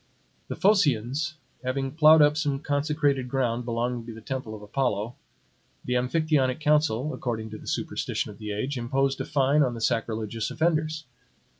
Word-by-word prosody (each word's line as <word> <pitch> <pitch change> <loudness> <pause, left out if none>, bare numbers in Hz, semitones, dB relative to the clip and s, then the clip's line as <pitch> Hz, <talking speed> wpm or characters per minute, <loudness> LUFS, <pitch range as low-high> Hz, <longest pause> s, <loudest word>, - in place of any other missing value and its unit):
The - - -4
Phocians 155 - +2 0.3
having 135 +1 -2
ploughed 155 +1 +7
up 150 0 +4
some 145 -3 0
consecrated 145 -3 0
ground 125 -2 0
belonging 120 0 -2
to 115 - -7
the - - -9
temple 120 -2 -5
of 105 - -11
Apollo, 110 -1 -1 0.7
the 125 - -1
Amphictyonic 130 +1 +1
council, 150 -3 +2
according 110 -4 -4
to 110 - -7
the - - -13
superstition - - -2
of 100 - -14
the 105 -1 -5
age, 125 +6 -2
imposed 135 +3 0
a - - -3
fine 140 +2 +2
on 125 -4 +1
the - - -6
sacrilegious 110 -1 -1
offenders. 155 -1 0
135 Hz, 160 wpm, -26 LUFS, 115-150 Hz, 0.7 s, ploughed